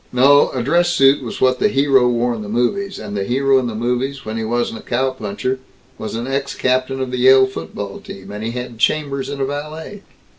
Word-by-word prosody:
No; 140 Hz, +3 st, +5 dB
a 125 Hz, -2 st, -3 dB
dress 170 Hz, +6 st, +2 dB
suit 140 Hz, -5 st, +4 dB
was 120 Hz, -4 st, -6 dB
what 130 Hz, -1 st, +2 dB
the -, -, +4 dB
hero 135 Hz, -7 st, +3 dB
wore 120 Hz, 0 st, +1 dB
in 115 Hz, -, -5 dB
the 105 Hz, -, -7 dB
movies; 155 Hz, -, -1 dB
and 105 Hz, -1 st, -7 dB
the 100 Hz, -, -1 dB
hero 135 Hz, +5 st, +2 dB
in 125 Hz, -, -2 dB
the 115 Hz, -, -5 dB
movies, 125 Hz, +4 st, -2 dB
when 110 Hz, 0 st, -4 dB
he 115 Hz, -, -2 dB
wasn't 115 Hz, 0 st, -1 dB
a -, -, -11 dB
cowpuncher, 130 Hz, -1 st, -2 dB, 0.4 s
was 110 Hz, -, -5 dB
an 115 Hz, +1 st, -3 dB
ex 135 Hz, +1 st, -2 dB
captain 130 Hz, +1 st, 0 dB
of 130 Hz, -1 st, -3 dB
the 125 Hz, -, -2 dB
Yale 130 Hz, +1 st, +7 dB
football 100 Hz, -4 st, -6 dB
team, 95 Hz, +1 st, -10 dB
and 105 Hz, +1 st, -6 dB
had 120 Hz, 0 st, -5 dB
chambers 140 Hz, 0 st, 0 dB
and 140 Hz, -, -5 dB
a 135 Hz, -, +1 dB
valet. 150 Hz, +7 st, -6 dB
130 Hz, 220 wpm, -19 LUFS, 115-135 Hz, 0.4 s, Yale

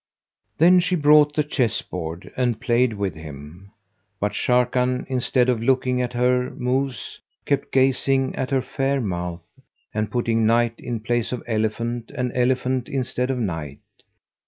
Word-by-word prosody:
'" -, -, -52 dB
Then 180 Hz, +3 st, +6 dB
she 180 Hz, +1 st, +1 dB
brought 150 Hz, -1 st, +5 dB
the 150 Hz, -, +2 dB
chess 130 Hz, -6 st, 0 dB
board 80 Hz, +2 st, -6 dB
and 120 Hz, -3 st, 0 dB
played 120 Hz, -1 st, +2 dB
with 100 Hz, -4 st, -2 dB
him; 80 Hz, +4 st, -11 dB, 0.5 s
but 105 Hz, +1 st, 0 dB
Sharrkan, 125 Hz, +3 st, +1 dB
instead 130 Hz, -1 st, +1 dB
of 120 Hz, -3 st, +1 dB
looking 125 Hz, 0 st, +1 dB
at 125 Hz, 0 st, -3 dB
her 125 Hz, +1 st, +2 dB
moves, 130 Hz, +1 st, -2 dB, 0.3 s
kept 140 Hz, -1 st, -1 dB
gazing 135 Hz, 0 st, +2 dB
at 130 Hz, -, -2 dB
her 135 Hz, -2 st, +1 dB
fair 135 Hz, +1 st, -1 dB
mouth, 90 Hz, -5 st, -4 dB, 0.5 s
and 105 Hz, -1 st, -1 dB
putting 115 Hz, -1 st, 0 dB
knight 115 Hz, 0 st, +2 dB
in 120 Hz, -3 st, -4 dB
place 120 Hz, +1 st, -1 dB
of 125 Hz, -, -4 dB
elephant 115 Hz, +1 st, -2 dB
and 125 Hz, -3 st, -1 dB
elephant[FN#198] 125 Hz, 0 st, 0 dB
in 135 Hz, -2 st, 0 dB
stead 125 Hz, 0 st, -2 dB
of 135 Hz, -, 0 dB
knight. 80 Hz, -, -3 dB
125 Hz, 160 wpm, -23 LUFS, 110-130 Hz, 0.5 s, Then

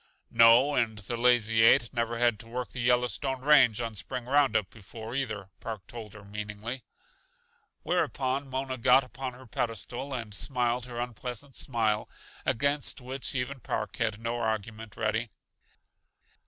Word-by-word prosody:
"No, 115 Hz, +5 st, +7 dB
and 115 Hz, -5 st, +1 dB
the 110 Hz, +3 st, -5 dB
Lazy 115 Hz, -2 st, +4 dB
Eight 115 Hz, +1 st, +5 dB
never 115 Hz, -1 st, -1 dB
had 120 Hz, -3 st, +2 dB
to 115 Hz, -, -10 dB
work 125 Hz, +2 st, -4 dB
the 130 Hz, -, -7 dB
Yellowstone 125 Hz, +2 st, +1 dB
range 130 Hz, -6 st, +6 dB
on 115 Hz, -2 st, -3 dB
spring 120 Hz, +5 st, -5 dB
roundup 125 Hz, -7 st, +2 dB
before 110 Hz, +2 st, -9 dB
either," 110 Hz, -8 st, -3 dB
Park 110 Hz, -4 st, -6 dB
told 110 Hz, -3 st, -9 dB
her 105 Hz, -1 st, -12 dB
meaningly. 105 Hz, +4 st, -5 dB, 1.0 s
Whereupon 135 Hz, +1 st, 0 dB
Mona 130 Hz, -1 st, -3 dB
got 135 Hz, +3 st, +6 dB
upon 130 Hz, 0 st, -6 dB
her 130 Hz, +1 st, -13 dB
pedestal 120 Hz, +2 st, -3 dB
and 115 Hz, -5 st, -4 dB
smiled 125 Hz, +1 st, -1 dB
her 120 Hz, -1 st, -6 dB
unpleasant 125 Hz, +3 st, -5 dB
smile, 110 Hz, -5 st, 0 dB, 0.4 s
against 140 Hz, +3 st, +1 dB
which 130 Hz, +2 st, -3 dB
even 130 Hz, +2 st, -2 dB
Park 105 Hz, -3 st, -3 dB
had 110 Hz, -3 st, 0 dB
no 115 Hz, +1 st, -2 dB
argument 110 Hz, 0 st, -3 dB
ready. 110 Hz, +1 st, 0 dB
120 Hz, 145 wpm, -29 LUFS, 110-130 Hz, 1.0 s, No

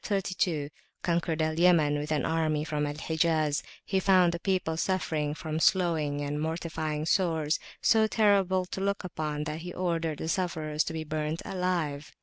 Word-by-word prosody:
132, 180 Hz, -7 st, -1 dB, 0.3 s
conquered 170 Hz, -2 st, 0 dB
Al 155 Hz, +1 st, -1 dB
Yaman 160 Hz, -5 st, +4 dB
with 150 Hz, +2 st, -4 dB
an 150 Hz, -, +1 dB
army 155 Hz, -2 st, +1 dB
from 150 Hz, -2 st, -1 dB
Al 145 Hz, -, -4 dB
Hijaz, 155 Hz, -1 st, +1 dB, 0.2 s
he 190 Hz, -, +1 dB
found 185 Hz, -2 st, +4 dB
the 170 Hz, -, -3 dB
people 185 Hz, -4 st, 0 dB
suffering 160 Hz, -4 st, -1 dB
from 155 Hz, 0 st, -3 dB
sloughing 160 Hz, -6 st, +2 dB
and 145 Hz, +1 st, -2 dB
mortifying 160 Hz, -1 st, -2 dB
sores, 165 Hz, -2 st, +1 dB, 0.2 s
so 220 Hz, -1 st, +5 dB
terrible 195 Hz, -4 st, +3 dB
to 190 Hz, -, -5 dB
look 200 Hz, +1 st, -1 dB
upon 155 Hz, -4 st, -3 dB
that 155 Hz, +1 st, -4 dB
he 175 Hz, +2 st, -7 dB
ordered 165 Hz, -4 st, -1 dB
the 160 Hz, -, -4 dB
sufferers 160 Hz, -3 st, 0 dB
to 160 Hz, -, -4 dB
be 160 Hz, -1 st, -3 dB
burnt 155 Hz, +1 st, -3 dB
alive. 170 Hz, -6 st, -2 dB
160 Hz, 165 wpm, -29 LUFS, 150-180 Hz, 0.3 s, so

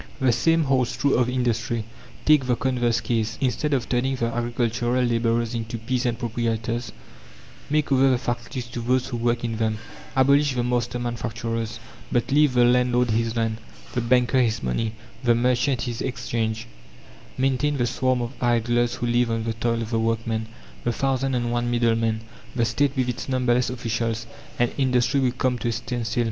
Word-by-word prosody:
The 130 Hz, -2 st, +3 dB
same 165 Hz, +7 st, +3 dB
holds 130 Hz, -3 st, +1 dB
true 140 Hz, -, +2 dB
of 125 Hz, 0 st, +3 dB
industry. 120 Hz, -2 st, 0 dB, 0.4 s
Take 150 Hz, -4 st, +5 dB
the 125 Hz, -, +3 dB
converse 120 Hz, -2 st, +1 dB
case: 110 Hz, -2 st, -1 dB
instead 135 Hz, +3 st, 0 dB
of 130 Hz, -4 st, 0 dB
turning 130 Hz, +2 st, 0 dB
the 115 Hz, -2 st, -1 dB
agricultural 120 Hz, +1 st, 0 dB
labourers 115 Hz, -1 st, +1 dB
into 115 Hz, 0 st, -3 dB
peasant 120 Hz, +1 st, -1 dB
proprietors, 115 Hz, 0 st, -2 dB, 0.8 s
make 150 Hz, -1 st, +1 dB
over 135 Hz, 0 st, +5 dB
the 130 Hz, -, +3 dB
factories 120 Hz, +1 st, -4 dB
to 120 Hz, -, -5 dB
those 130 Hz, +2 st, +1 dB
who 120 Hz, -, -3 dB
work 120 Hz, 0 st, 0 dB
in 115 Hz, -2 st, -2 dB
them. 110 Hz, -1 st, 0 dB, 0.4 s
Abolish 140 Hz, +1 st, +4 dB
the 120 Hz, -, 0 dB
master 120 Hz, 0 st, 0 dB
manufacturers, 115 Hz, -1 st, -3 dB, 0.3 s
but 120 Hz, +2 st, 0 dB
leave 145 Hz, -2 st, +4 dB
the 120 Hz, 0 st, +6 dB
landlord 125 Hz, -1 st, +3 dB
his 115 Hz, +1 st, 0 dB
land, 115 Hz, -1 st, 0 dB, 0.3 s
the 125 Hz, -, 0 dB
banker 125 Hz, +2 st, +3 dB
his 115 Hz, -2 st, 0 dB
money, 110 Hz, -, -1 dB, 0.3 s
the 120 Hz, -1 st, +4 dB
merchant 125 Hz, 0 st, +1 dB
his 120 Hz, -2 st, -4 dB
Exchange; 115 Hz, -3 st, -2 dB, 0.7 s
maintain 135 Hz, +2 st, +1 dB
the 120 Hz, -, +1 dB
swarm 130 Hz, 0 st, 0 dB
of 120 Hz, +2 st, -5 dB
idlers 120 Hz, 0 st, +2 dB
who 120 Hz, -, -3 dB
live 120 Hz, 0 st, +2 dB
on 115 Hz, -1 st, -1 dB
the 115 Hz, 0 st, -1 dB
toil 115 Hz, +1 st, -1 dB
of 110 Hz, -, -7 dB
the 115 Hz, -, +1 dB
workmen, 115 Hz, 0 st, -1 dB, 0.4 s
the 120 Hz, -, +1 dB
thousand 135 Hz, +1 st, 0 dB
and 120 Hz, -1 st, -1 dB
one 120 Hz, 0 st, 0 dB
middlemen, 115 Hz, -2 st, +1 dB, 0.3 s
the 120 Hz, -2 st, +2 dB
State 140 Hz, +4 st, 0 dB
with 130 Hz, -1 st, +1 dB
its 125 Hz, +2 st, -4 dB
numberless 125 Hz, -2 st, +2 dB
officials, 115 Hz, -2 st, -2 dB, 0.3 s
and 120 Hz, -1 st, +2 dB
industry 130 Hz, 0 st, +2 dB
would 130 Hz, -2 st, 0 dB
come 125 Hz, -1 st, +1 dB
to -, -, -2 dB
a -, -, +1 dB
standstill. 120 Hz, 0 st, -3 dB
120 Hz, 180 wpm, -24 LUFS, 115-125 Hz, 0.8 s, the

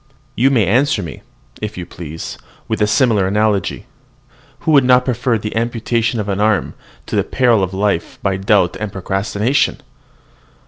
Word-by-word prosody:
You 130 Hz, +5 st, +3 dB
may 120 Hz, -7 st, +3 dB
answer 120 Hz, +2 st, +2 dB
me, 80 Hz, -5 st, -8 dB, 0.4 s
if 105 Hz, -1 st, -5 dB
you 90 Hz, -, -5 dB
please, 80 Hz, -2 st, -7 dB, 0.3 s
with 110 Hz, -1 st, -2 dB
a 105 Hz, -, +4 dB
similar 110 Hz, -4 st, +3 dB
analogy, 105 Hz, 0 st, 0 dB, 0.8 s
"Who 160 Hz, -, 0 dB
would 140 Hz, -3 st, +6 dB
not 125 Hz, 0 st, +4 dB
prefer 125 Hz, -1 st, 0 dB
the 105 Hz, +1 st, -5 dB
amputation 115 Hz, 0 st, 0 dB
of 105 Hz, -, -3 dB
an 100 Hz, -1 st, -1 dB
arm 105 Hz, -2 st, +1 dB, 0.3 s
to -, -, -4 dB
the -, -, +2 dB
periling 120 Hz, -5 st, +2 dB
of 90 Hz, -, -9 dB
life 95 Hz, -3 st, -1 dB
by 95 Hz, -1 st, 0 dB
doubt 95 Hz, -2 st, +2 dB
and 110 Hz, -2 st, -4 dB
procrastination!" 100 Hz, +7 st, 0 dB
105 Hz, 165 wpm, -17 LUFS, 95-120 Hz, 0.8 s, would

